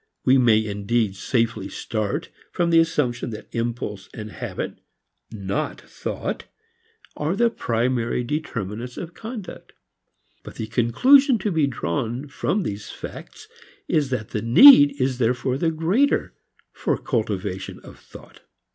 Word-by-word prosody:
We 130 +1 +5
may 110 -3 +4
indeed 105 0 -1
safely 115 -3 -1
start 110 -3 -3 0.2
from 170 -1 0
the 165 - +6
assumption 140 -8 0
that 110 - -8
impulse 115 -4 -4
and 105 -1 -7
habit, - - -5 0.5
not 100 -3 -3
thought, - - -5 0.7
are 155 +5 -1
the 235 +2 +3
primary 120 - -1
determinants 120 -4 -4
of 170 -1 -6
conduct. 220 -3 -8 0.7
But - - -11
the 110 - -4
conclusion 235 - +4
to 210 0 -2
be 160 -4 +2
drawn 120 - -3
from 185 +7 -1
these 105 -6 -5
facts - - -10 0.4
is 145 -4 +1
that 125 -5 -3
the 105 - -3
need 145 - +8
is 130 -1 0
therefore 125 +2 0
the 165 - +2
greater 175 - +1 0.4
for - - -1
cultivation - - -3
of - - -14
thought. - - -15
125 Hz, 130 wpm, -23 LUFS, 110-160 Hz, 0.7 s, need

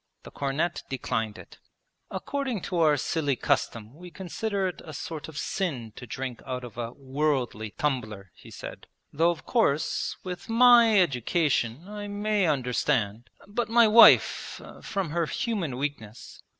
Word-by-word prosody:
The - - -11
cornet 145 +5 -2
declined 115 -5 -2
it. - - -14 0.5
'According 270 -8 -3
to 180 - -2
our 155 -3 +4
silly 145 0 0
custom 115 -1 -1
we 175 +4 -11
consider 195 +2 -3
it 180 - -6
a 155 -2 -9
sort 155 +1 -6
of 160 -2 -10
sin 130 - -3
to 125 - -10
drink 130 -1 -5
out 125 -1 -5
of 120 -4 -9
a 115 -1 -4
"worldly" 135 -5 -1
tumbler,' 110 - -2
he - - -15
said. - - -9 0.3
'Though, 165 +4 +3
of 170 - -4
course, 160 - 0
with 180 +2 -7
my 230 -2 +7
education 140 - 0
I 205 0 -6
may 205 -1 0
understand, 125 -5 0 0.2
but 220 +2 -2
my 230 0 +6
wife 230 +2 +6 0.2
from 195 -7 -3
her 170 0 0
human 185 - -2
weakness...' 120 -6 -6
150 Hz, 150 wpm, -27 LUFS, 125-195 Hz, 0.5 s, my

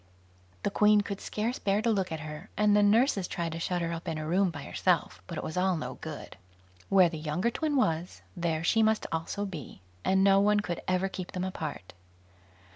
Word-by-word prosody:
The - - 0
Queen 210 0 +5
could 200 -1 -5
scarce 225 +4 -2
bear 200 +1 +1
to 230 - +3
look 190 -4 0
at 160 -1 -4
her, 155 +5 -8
and 210 -1 +4
the 210 - +5
nurses 205 -2 +3
tried 170 -1 -3
to 165 - -5
shut 175 +1 -1
her 170 0 -2
up 165 +1 -6
in 160 - -2
a 155 - -4
room 185 +4 +2
by 145 -4 -7
herself, 90 - 0
but - - -6
it - - -4
was 160 - -5
all 185 -1 +2
no 125 -4 -4
good; 155 -10 -8 0.5
where 190 -2 +6
the 165 -2 -5
younger 160 +9 -1
twin 305 +3 -1
was, 170 - 0
there 165 -2 -1
she 225 +6 +3
must 220 0 +2
also 165 +5 -2
be, 150 - -8 0.2
and 190 0 +3
no 195 0 +6
one 210 +1 +3
could 175 -5 -4
ever 185 +1 +1
keep 185 -1 -7
them 185 -1 -2
apart. 185 - -5
185 Hz, 215 wpm, -29 LUFS, 165-205 Hz, 0.5 s, where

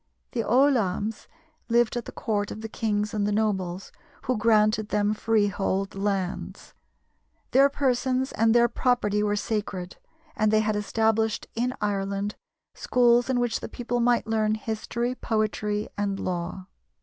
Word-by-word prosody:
The 230 - -1
ollamhs 225 -5 +1 0.4
lived 235 0 +3
at 240 - -3
the - - -7
court 205 -2 -2
of 215 - -7
the 225 - -4
kings 210 -1 -1
and 205 -1 0
the - - 0
nobles, 195 -4 -1 0.3
who 255 - 0
granted 215 -1 +3
them 210 0 +1
freehold 200 -3 0
lands; 195 -2 -3 0.8
their 275 +2 +6
persons 260 -1 0
and 225 +1 +2
their 240 0 +6
property 235 -4 +1
were 205 0 +1
sacred; 205 -4 -3 0.4
and 215 0 +2
they 215 0 +4
had 215 -1 0
established 220 +1 0
in 245 +2 -1
Ireland 200 0 -1 0.4
schools 245 0 +3
in 255 -2 +2
which 240 -2 0
the - - -7
people 245 0 -3
might 240 0 +2
learn 215 -1 +1
history, 230 +3 -3
poetry, 215 -3 -1
and 200 -1 -1
law. 180 +1 -4
215 Hz, 145 wpm, -26 LUFS, 205-235 Hz, 0.8 s, their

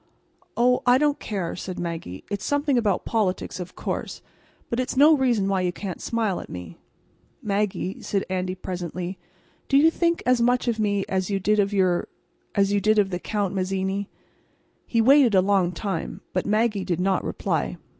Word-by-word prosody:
"Oh, 250 +1 +3
I 245 +1 +7
don't 295 +1 +1
care," 190 -6 -3
said 185 0 -6
Maggie. 165 - -5
"It's 200 -1 -3
something 285 -1 +1
about 210 -6 +1
politics, 195 -5 -1
of 180 -1 -7
course. - - -4 0.4
But 235 - -2
it's 255 +1 -2
no 300 +3 +7
reason 245 -8 +1
why 195 -1 +1
you 180 -1 0
can't 185 -1 -6
smile 225 -5 -1
at - - -9
me." 90 -2 -8 0.6
"Maggie," 200 -2 -1
said 200 -1 -1
Andy, 185 0 -2
presently, 180 0 -5 0.5
"do 275 - +5
you 320 +3 +6
think 335 0 0
as 250 -1 +3
much 245 +1 +2
of 230 -2 0
me 205 -2 +1
as 190 0 -1
you 200 -1 0
did 210 +3 +2
of 200 0 +2
your—as 195 +1 -1
you 200 - +2
did 215 +2 +3
of 200 -2 +3
the 180 - -2
Count 205 -2 -2
Mazzini?" 190 +1 -2 0.8
He 230 - +2
waited 260 -2 +6
a - - +7
long 190 -2 +2
time, 185 -1 -4
but 185 - -1
Maggie 215 -1 +1
did 180 -3 -2
not 190 +1 +1
reply. - - -2
200 Hz, 180 wpm, -24 LUFS, 185-230 Hz, 0.8 s, I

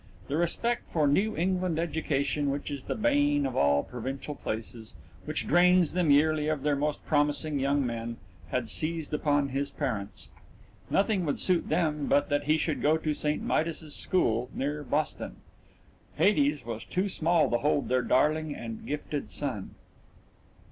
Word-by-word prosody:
That 145 - 0
respect 230 +8 0
for 155 -3 +2
a - - +4
New 205 +10 +2
England 180 -1 0
education 150 -3 0
which 140 +2 -3
is 140 -2 -4
the - - -2
bane 290 +3 +2
of - - -3
all 70 0 +3
provincial 130 +4 -5
places, 110 -3 -5 0.3
which - - -2
drains 180 0 +5
them 175 -3 +1
yearly 150 +1 +4
of 155 -3 -1
their 145 -1 +2
most 150 +1 -2
promising 145 0 +1
young 140 0 +1
men, 115 -1 -4 0.3
had 125 +3 -1
seized 160 +4 -1
upon 145 -2 +1
his 140 +2 -2
parents. 100 -1 -4 0.6
Nothing 195 -1 +2
would 145 - -1
suit 180 -2 +2
them 150 -4 0
but 145 - +2
that 145 0 0
he 155 +2 +3
should 155 -1 -1
go 155 +2 +3
to 155 -1 -1
St. 150 0 -1
Midas's 160 -1 -1
School 120 -9 0
near 145 +2 -2
Boston 145 - -2 0.8
Hades 145 - +2
was 115 -1 -5
too 185 +3 -1
small 170 -3 +2
to 120 - +2
hold 145 -1 +1
their 130 0 +2
darling 150 +4 +1
and 115 -1 -7
gifted 150 0 -4
son. 125 -10 -4
150 Hz, 160 wpm, -28 LUFS, 135-165 Hz, 0.8 s, drains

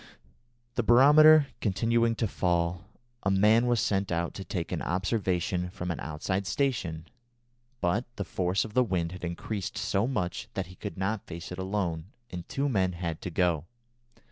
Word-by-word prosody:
The - - 0
barometer 145 +6 +7
continuing 115 +3 +1
to 115 - 0
fall, 85 -1 0 0.4
a 95 - 0
man 105 +5 +4
was 120 -2 +2
sent 100 -2 0
out 85 0 -1
to 95 - -6
take 90 -4 -4
an - - -2
observation 90 -1 -1
from 90 -2 -4
an 85 - -4
outside 95 +5 -3
station, 85 - -1 0.8
but 100 +7 +1
the 100 - -3
force 95 +2 0
of 110 - -9
the 125 - +4
wind 90 -6 -1
had 90 0 -9
increased 90 +3 -4
so 100 +4 0
much 90 -10 -3
that 95 - -1
he 90 +2 -13
could 105 +2 -7
not 100 +2 -2
face 85 +2 -7
it 90 - -6
alone, 95 -4 -2 0.3
and 90 -1 -7
two 140 +1 -1
men 95 -8 +1
had 85 -2 -4
to - - -4
go. 85 -2 +1
95 Hz, 170 wpm, -28 LUFS, 85-110 Hz, 0.8 s, barometer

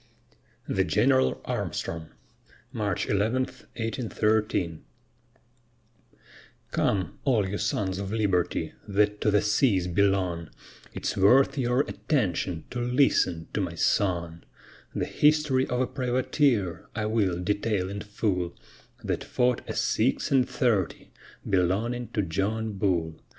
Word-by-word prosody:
THE - - +1
GENERAL 65 0 +2
ARMSTRONG 80 -1 -3 0.6
[March 105 -7 -2
11, 110 +6 +1 0.3
1813] 110 -6 -1 1.9
Come, 95 -6 0
all 115 -8 +2
you 100 +2 -3
sons 95 -2 -1
of 100 0 -4
Liberty, 100 -5 0
that 105 +1 +1
to - - +3
the 105 -1 +3
seas 105 -3 +2
belong, 90 -3 +1 0.4
It's - - -3
worth 120 +8 +5
your 125 -1 +2
attention 90 - -1
to 120 - -3
listen 120 - +2
to - - 0
my - - -3
song; 85 -4 0 0.5
The - - 0
history 150 -3 +2
of 125 - -1
a - - +3
privateer 125 - 0
I 105 -1 -1
will 105 -5 +1
detail 100 0 0
in 100 +1 -5
full, 100 -4 -2 0.5
That - - -2
fought 125 -1 +1
a - - -3
"six - - +1
and 130 -2 +3
thirty" 115 - 0 0.4
belonging 100 +6 0
to 105 - +1
John 105 +5 -1
Bull. 85 -5 -1
105 Hz, 120 wpm, -27 LUFS, 90-120 Hz, 1.9 s, worth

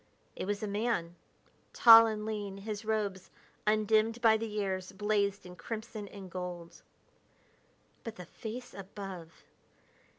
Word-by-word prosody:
It - - -4
was 205 +1 -2
a - - -1
man, 200 -5 -1 0.6
tall 230 -1 +9
and 215 -1 -3
lean, 205 -3 -4
his 210 +1 -5
robes, 205 -4 -2 0.4
undimmed 215 +2 +3
by 225 -2 +5
the 225 +1 -2
years, 190 -3 -3
blazed 205 -1 0
in 180 0 -10
crimson 215 +3 -6
and 195 -1 -10
gold. 175 -2 -7 1.2
But 230 - -6
the 180 - -9
face 235 +7 -8
above! 195 -4 -9
205 Hz, 130 wpm, -31 LUFS, 190-220 Hz, 1.2 s, tall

